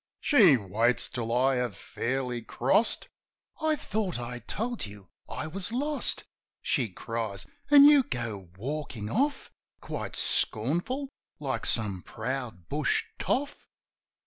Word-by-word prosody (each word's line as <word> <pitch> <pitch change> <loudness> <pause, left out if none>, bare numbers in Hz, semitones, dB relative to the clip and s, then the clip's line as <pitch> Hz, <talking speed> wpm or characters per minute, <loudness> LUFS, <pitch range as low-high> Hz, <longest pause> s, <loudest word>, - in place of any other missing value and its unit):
She 195 - +6
waits 110 +4 +1
till 115 -2 -3
I 130 +2 +3
have 125 -5 -2
fairly 125 -1 -2
crossed: 130 - +1 0.5
"I 315 0 +3
thought 210 - -2
I 120 0 -5
told 230 - -3
you 100 -3 -13 0.2
I - - -3
was 180 +6 -3
lost?" 285 +4 0 0.4
She 125 -5 +1
cries. 100 -2 -4 0.2
"An' 285 -1 +10
you 295 -1 +8
go 115 - -4
walkin' 130 -3 -4
off, 285 +2 0 0.3
Quite - - -5
scornful, 175 - 0 0.3
like 140 -3 -2
some 100 -5 0
proud 115 -6 -5
bush 145 0 +1 0.2
toff 285 +2 -1
130 Hz, 120 wpm, -29 LUFS, -, 0.5 s, An